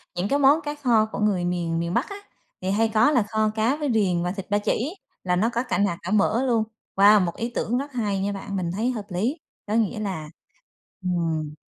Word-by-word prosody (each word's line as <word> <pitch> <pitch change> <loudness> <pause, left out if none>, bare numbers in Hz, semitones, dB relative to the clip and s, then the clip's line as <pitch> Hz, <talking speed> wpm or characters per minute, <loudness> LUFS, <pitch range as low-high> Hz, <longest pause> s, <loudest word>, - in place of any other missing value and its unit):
những 180 +3 -1
cái 285 - +2
món 285 +3 +5
cá 295 -1 -4
kho 240 -7 +3
của - - -5
người 195 -4 +1
miền 170 -2 -1
miền 170 +1 -2
Bắc 250 +10 0
á, 400 - -6 0.5
thì 185 - -2
hay 220 +2 +2
có 225 +6 +5
là 245 -7 +3
kho 220 -1 +1
cá 225 +5 +2
với 295 -2 -2
riềng 180 -5 +1
và 180 - -1
thịt 195 -1 -7
ba 205 - +2
chỉ, 255 - -1 0.3
là 180 -1 +1
nó 215 +6 +2
có 235 - 0
cả 260 - -2
nạc 200 -4 +1
cả - - -5
mỡ 215 +4 +2
luôn. 230 -3 +2 0.3
Wow, 205 +1 +7
một 170 - -4
ý 235 - -3
tưởng 240 +3 0
rất 280 +2 -4
hay 210 -5 -1
nha 200 +1 -1
bạn, 200 0 -5
mình 175 -3 -2
thấy 225 +7 0
hợp 220 -5 -5
lý. 220 - -1 0.3
Có 210 - -2
nghĩa 225 0 +1
là 185 -8 -4 0.7
ừm. 165 -4 -1
210 Hz, 240 wpm, -24 LUFS, 180-235 Hz, 0.7 s, Wow